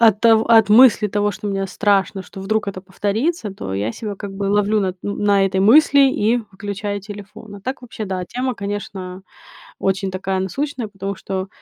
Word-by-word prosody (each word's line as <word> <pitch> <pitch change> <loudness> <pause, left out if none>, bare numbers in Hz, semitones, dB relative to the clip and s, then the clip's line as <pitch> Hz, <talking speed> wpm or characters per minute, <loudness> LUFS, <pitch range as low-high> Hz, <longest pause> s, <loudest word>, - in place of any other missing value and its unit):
от 220 -3 +5
тов 225 -1 +5
от 225 -3 +6
мысли 220 -1 +6
того, 205 +1 0
что 205 - -7
мне 195 -1 -1
страшно, 195 -1 0
что 195 - -11
вдруг 210 +1 -1
это 190 -1 -5
повторится, 210 - -2
то 95 - -6
я 105 +4 -2
себя 210 -2 -5
как 200 -1 -7
бы 200 0 -4
ловлю 205 +1 +2
на 190 -2 0
т 185 - -29
ну, 200 - -3
на 200 -1 +3
этой 190 0 0
мысли 280 +7 +6
и 240 -4 +1
выключаю 200 +1 -4
телефон. 205 +1 -10
А - - -12
так, 260 +4 -5
вообще 225 -3 -6
да, 185 -2 -3
тема, 250 +6 -3
конечно, 195 -2 -6 0.6
очень 195 0 -1
такая 190 0 -2
насущная, 250 +5 -3
потому 195 -1 -5
что, 190 0 -4
205 Hz, 195 wpm, -20 LUFS, 195-220 Hz, 0.6 s, от